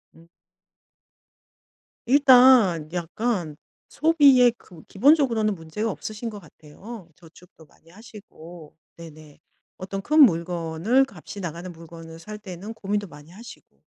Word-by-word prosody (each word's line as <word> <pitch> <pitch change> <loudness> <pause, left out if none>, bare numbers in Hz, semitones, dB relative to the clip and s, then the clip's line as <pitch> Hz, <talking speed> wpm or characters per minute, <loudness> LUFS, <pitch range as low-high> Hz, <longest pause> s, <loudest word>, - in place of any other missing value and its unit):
음. 165 +1 -20 1.8
일단 250 - +5
약간 175 -2 -3 0.3
소비의 280 -6 +4
그 165 -3 -17
기본적으로는 230 -3 +2
문제가 190 +6 -5
없으신 215 +4 -7
거 210 - -10
같아요. 175 +5 -13
저축도 165 -1 -19
많이 160 - -26
하시고 175 -7 -14 0.2
네네. 155 -3 -14 0.4
어떤 195 +1 -6
큰 305 +8 +1
물건을 175 - +2
값이 195 0 -11
나가는 170 +1 -7
물건을 165 0 -13
살 210 +5 -10
때는 200 +2 -9
고민도 205 -1 -4
많이 150 +1 -16
하시고. 230 +6 -15
190 Hz, 260 characters per minute, -23 LUFS, 165-230 Hz, 1.8 s, 일단